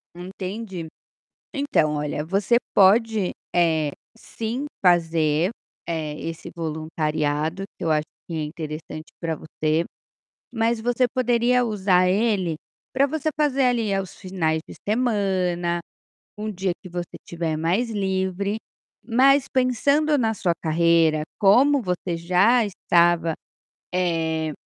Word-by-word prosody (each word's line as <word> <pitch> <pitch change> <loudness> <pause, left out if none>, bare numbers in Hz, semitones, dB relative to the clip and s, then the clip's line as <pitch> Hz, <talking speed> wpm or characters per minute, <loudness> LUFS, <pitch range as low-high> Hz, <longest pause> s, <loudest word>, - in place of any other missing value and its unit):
Entendi. 185 0 -6 0.7
Então, 160 - +1
olha 150 0 -2
você 195 +6 +2 0.2
pode, 210 0 +4 0.2
eh, 165 -2 +4 0.4
sim 230 +5 -5 0.2
fazer, 165 -1 +3 0.4
eh, 155 -2 -3
esse 165 0 -6
voluntariado 155 +1 -2 0.2
que - - -5
eu 160 - 0
acho 155 0 +2 0.2
que 165 - -5
é 155 - -1
interessante 155 0 -7
para 165 -2 -1
você, 155 +1 -1 0.7
mas 230 -1 +1
você 245 +2 +1
poderia 245 0 +2
usar 190 -5 +2
ele 190 -5 +1 0.4
para 275 +2 +3
você 310 +1 -2
fazer 275 -3 +2
ali 235 -5 +1
aos 195 -1 -3
finais 165 -5 -1
de - - -10
semana, 190 -7 0 0.6
um 215 0 -3
dia 190 -2 -1
que 185 - -9
você 175 0 -6
estiver 165 -2 -3
mais 185 +10 0
livre, 195 0 -1 0.5
mas 270 +3 +4
pensando 280 +4 +2
na 225 -2 +1
sua 180 -4 0
carreira 160 -1 +3 0.2
como 265 +8 +5
você 180 -2 -2
já 185 +8 +3
estava, 170 -4 +2 0.6
eh, 160 -3 0
185 Hz, 120 wpm, -23 LUFS, 165-225 Hz, 0.7 s, como